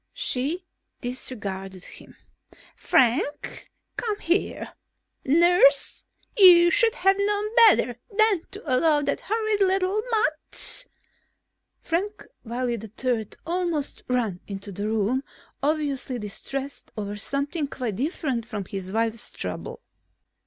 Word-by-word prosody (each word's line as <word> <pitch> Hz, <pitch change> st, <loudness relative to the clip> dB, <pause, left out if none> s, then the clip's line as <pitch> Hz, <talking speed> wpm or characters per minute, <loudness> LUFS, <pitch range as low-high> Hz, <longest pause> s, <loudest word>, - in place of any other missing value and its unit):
She 345 Hz, -, -1 dB, 0.3 s
disregarded 195 Hz, -7 st, -5 dB
him. -, -, -13 dB, 0.6 s
"Frank! 260 Hz, +4 st, +1 dB, 0.3 s
Come 430 Hz, -3 st, -1 dB
here! 345 Hz, +4 st, -1 dB, 0.5 s
Nurse, 315 Hz, -2 st, +4 dB, 0.3 s
you 350 Hz, -4 st, +8 dB
should 455 Hz, +4 st, +3 dB
have 385 Hz, +1 st, +3 dB
known 415 Hz, +2 st, 0 dB
better 245 Hz, -, +3 dB
than 430 Hz, -4 st, +3 dB
to 405 Hz, +2 st, -9 dB
allow 295 Hz, +2 st, +3 dB
that -, -, -1 dB
horrid 435 Hz, -1 st, -1 dB
little 380 Hz, +2 st, +2 dB
mutt...." 440 Hz, +4 st, +1 dB, 1.0 s
Frank 400 Hz, +5 st, -2 dB, 0.2 s
Wiley 240 Hz, -1 st, -2 dB
III 220 Hz, +1 st, -2 dB, 0.2 s
almost 340 Hz, -4 st, -2 dB
ran 230 Hz, -8 st, -1 dB
into 200 Hz, 0 st, -7 dB
the 205 Hz, +3 st, -4 dB
room, 220 Hz, +5 st, 0 dB, 0.4 s
obviously 285 Hz, -4 st, -1 dB
distressed 270 Hz, +6 st, -5 dB
over 205 Hz, -1 st, -4 dB
something 280 Hz, -, -2 dB
quite 240 Hz, -8 st, -4 dB
different 270 Hz, -, -2 dB
from 215 Hz, -4 st, -6 dB
his 190 Hz, 0 st, -6 dB
wife's 225 Hz, +1 st, -1 dB
trouble. -, -, -6 dB
280 Hz, 110 wpm, -25 LUFS, 230-365 Hz, 1.0 s, you